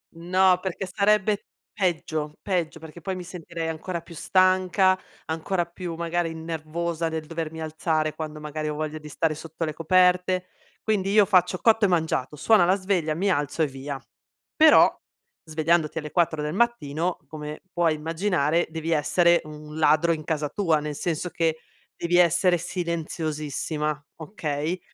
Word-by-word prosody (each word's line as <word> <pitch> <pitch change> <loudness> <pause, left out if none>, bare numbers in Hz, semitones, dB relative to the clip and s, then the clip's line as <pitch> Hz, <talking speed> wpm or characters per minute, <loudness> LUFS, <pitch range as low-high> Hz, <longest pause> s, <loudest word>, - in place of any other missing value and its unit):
No, 180 +2 +3
perché 190 0 -3
sarebbe 210 0 +2 0.3
peggio 160 -5 -1
peggio, 175 -5 -1
perché 160 +1 -11
poi 190 +2 -3
mi 180 - -6
sentirei 170 -2 -6
ancora 170 +2 -4
più 170 0 -13
stanca, 185 +2 +3 0.3
ancora 170 +3 -1
più 170 -1 -6
magari 170 0 -1
nervosa 165 +1 -3
nel 160 -1 -4
dovermi 160 0 -5
alzare 155 0 -1
quando 155 -1 -6
magari 150 0 -4
ho 150 - -3
voglia 155 0 -4
di 150 0 -10
stare 155 +2 0
sotto 160 +1 -5
le 155 - -3
coperte. 180 +2 +3 0.4
Quindi 200 -3 0
io 210 -1 +6
faccio 185 -2 +3
cotto 225 -2 +4
e - - +4
mangiato, 160 -5 0
suona 175 +4 +4
la 185 +2 +4
sveglia, 185 -5 0
mi 195 +4 0
alzo 145 +1 0
e - - +2
via. 135 +1 -6 0.6
Però 315 -1 +7 0.5
svegliandoti 160 0 +1
alle 150 -2 -4
4 165 -3 +1
del 150 +1 -2
mattino, 180 -7 0
come 150 0 -7
puoi 165 -3 +2
immaginare, 165 0 0
devi 160 +1 -4
essere 170 +3 +3
un 150 0 -9
ladro 155 +2 +4
in 155 -1 -5
casa 150 -2 -1
tua, 165 -7 +1
nel 150 -1 -4
senso 175 +2 -2
che 165 -2 0 0.4
devi 175 +1 +1
essere 175 +1 +4
silenziosissima, 155 -3 -3
okay, 160 -1 -3
165 Hz, 155 wpm, -25 LUFS, 155-180 Hz, 0.6 s, Però